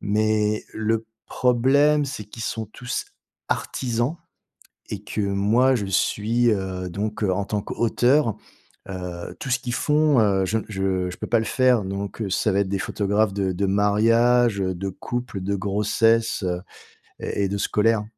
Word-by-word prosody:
Mais 105 +1 +1
le 110 +1 -1 0.2
problème, 140 +4 +3
c'est 120 -6 -5
qu'ils 110 +2 -9
sont 110 -1 -3
tous 125 +4 -5 0.4
artisans 125 +5 -1 0.7
et 105 -1 -5
que 105 - -3
moi, 105 +7 +3
je 105 -5 -2
suis, 115 +5 +1
heu, 95 -3 -2
donc, 105 +4 -3
heu, 95 - +2
en 100 +2 -2
tant 105 0 -2
qu'auteur, 120 +4 +2 0.6
heu 90 -2 -6
tout 135 - -5
ce 125 - +2
qu'ils 120 -1 -4
font, 150 -2 +3
heu, 100 -3 +2
je 105 +4 0
je 95 -2 -1
je - - -9
peux - - -5
pas 115 - +3
le 110 - -2
faire. 125 -2 +3
Donc, 100 +3 -5
heu, 100 - -2
ça 105 +3 +1
va 95 - +1
être 100 - -1
des 100 -1 -1
photographes 105 +1 0
de 95 -1 0
de 100 +3 -1
mariages, 115 +3 +3
heu, 95 -1 0
de 95 +2 -3
couples, 120 +1 -5
de 100 +2 -1
grossesses, 105 +3 +1
heu, 90 -1 -1 0.6
et 100 - -1
et 95 - 0
de 100 - -2
scolaires. 105 +1 +2
105 Hz, 170 wpm, -23 LUFS, 100-120 Hz, 0.7 s, problème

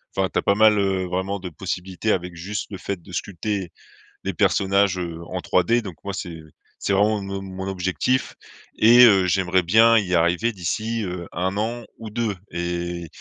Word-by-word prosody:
Enfin, 95 -1 +1
tu - - -3
as - - -1
pas 100 - +3
mal, 110 0 +5
heu, 95 -2 0
vraiment, 95 +3 -2
de 90 -1 -6
possibilités 95 +4 -3
avec 90 -1 -3
juste, 100 +5 -4
le 100 - -5
fait 95 0 -5
de 90 - -14
sculpter 95 0 -3 0.5
les - - -1
personnages, 100 -1 +2
heu, 85 -2 -5
en 95 - -4
3D. 90 +7 +2
Donc 95 -6 -8
moi, 100 - -4
c'est 85 -4 -6 0.4
c'est - - -2
vraiment 105 +2 +2
mon 100 0 -5
mon 95 0 -6
objectif 95 +7 -1 0.4
et 120 +3 +8
heu, 95 -4 +5
j'aimerais 95 0 +2
bien 115 +6 +6
y 95 -4 +1
arriver 85 +7 +2
d'ici, 110 +4 -2
heu, 90 -1 -5
1 95 +3 -2
an 115 +3 -2
ou 110 - -8
2 110 -2 -2 0.2
et 85 0 -3
95 Hz, 185 wpm, -23 LUFS, 90-105 Hz, 0.5 s, et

